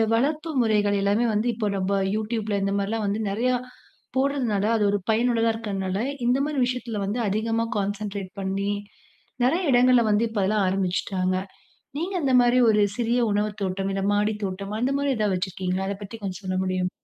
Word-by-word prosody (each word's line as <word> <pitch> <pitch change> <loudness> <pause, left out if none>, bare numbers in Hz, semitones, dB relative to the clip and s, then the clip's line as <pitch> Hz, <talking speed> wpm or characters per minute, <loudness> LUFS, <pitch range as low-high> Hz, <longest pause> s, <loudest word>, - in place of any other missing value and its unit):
வளர்ப்பு 305 +6 0
முறைகள் 205 -2 +2
எல்லாமே 205 +4 +2
வந்து 215 +3 +1
இப்ப 215 -3 -1
நம்ப 190 +1 0 0.2
YouTubeல 215 -1 -1
இந்த 195 0 0
மாரிலாம் 210 +2 -1
வந்து 210 +2 -1
நெறையா 245 +5 +1 0.6
போடுறதுனால, 255 -7 +1
அது 210 - +1
ஒரு 205 - +1
பயனுள்ளதா 230 0 +2
இருக்கனால, 195 -3 -3 0.3
இந்தமாரி 275 +4 +1
விஷயத்தில 245 -4 -3
வந்து 215 +5 -2
அதிகமா 225 +3 0
கான்சன்ட்ரேட் 200 -1 -3
பண்ணி, 195 +1 -1 0.7
நெறைய 330 +9 +2
இடங்கள்ல 250 0 +5
வந்து 210 +2 +3
இப்ப 220 -2 -3
அதெல்லாம் 205 0 +2
ஆரம்பிச்சுட்டாங்க. 185 0 0 0.6
நீங்க 360 +5 -3
அந்தமாரி 250 -2 +4
ஒரு 210 -1 +3 0.2
சிறிய 240 0 +1
உணவுத் 210 +1 -1
தோட்டம், 195 +1 -1
இந்த 195 - -1
மாடித் 210 +1 0
தோட்டம், 195 +1 -4
அந்தமாரி 275 +3 +1
எதா 215 -1 +1
வச்சிருக்கீங்களா? 185 0 -2
அத 200 - -2
பத்தி 205 +3 -7
கொஞ்சம் 195 0 -5
சொல்ல 185 0 -2
முடியுமா? 185 -1 -1
210 Hz, 160 wpm, -25 LUFS, 195-240 Hz, 0.7 s, இடங்கள்ல